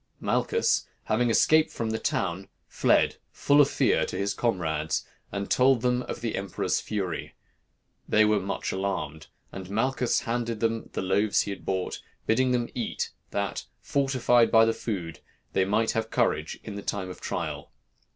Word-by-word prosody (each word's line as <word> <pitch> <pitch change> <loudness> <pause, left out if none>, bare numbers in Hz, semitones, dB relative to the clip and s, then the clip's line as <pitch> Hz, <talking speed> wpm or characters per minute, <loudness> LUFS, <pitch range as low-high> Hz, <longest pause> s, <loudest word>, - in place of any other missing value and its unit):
Malchus, - - +1 0.2
having 120 +2 +1
escaped 155 +7 +4
from 115 -1 -3
the 110 - -1
town, 95 -2 -1 0.2
fled, - - +2
full 145 +1 +4
of 140 - +4
fear, - - +2
to - - -4
his 100 0 0
comrades, 80 -10 -1 0.3
and 100 0 -3
told 130 -1 +4
them 125 0 +2
of 120 - -6
the 115 -2 -2
emperor's 95 -2 -1
fury. 95 -6 -4 0.7
They 110 0 +5
were 105 -1 +3
much 100 +1 -3
alarmed; 85 -6 -3 0.2
and 95 -1 -8
Malchus 120 +4 +1
handed 115 -1 -2
them 115 0 -1
the - - -2
loaves 100 +3 +2
he 100 - -3
had 100 - -8
bought, 95 -1 -2 0.2
bidding 130 +3 +2
them 120 -1 +1
eat, 120 -3 -3 0.2
that, 100 -1 -2
fortified 130 -4 +2
by 115 -1 +6
the 115 - +2
food, 90 -9 -4 0.3
they 95 - +3
might 110 +3 +2
have 110 0 -2
courage - - 0
in 105 - -7
the 100 - -5
time 95 -2 -3
of - - -11
trial. - - -4
110 Hz, 165 wpm, -27 LUFS, 95-120 Hz, 0.7 s, by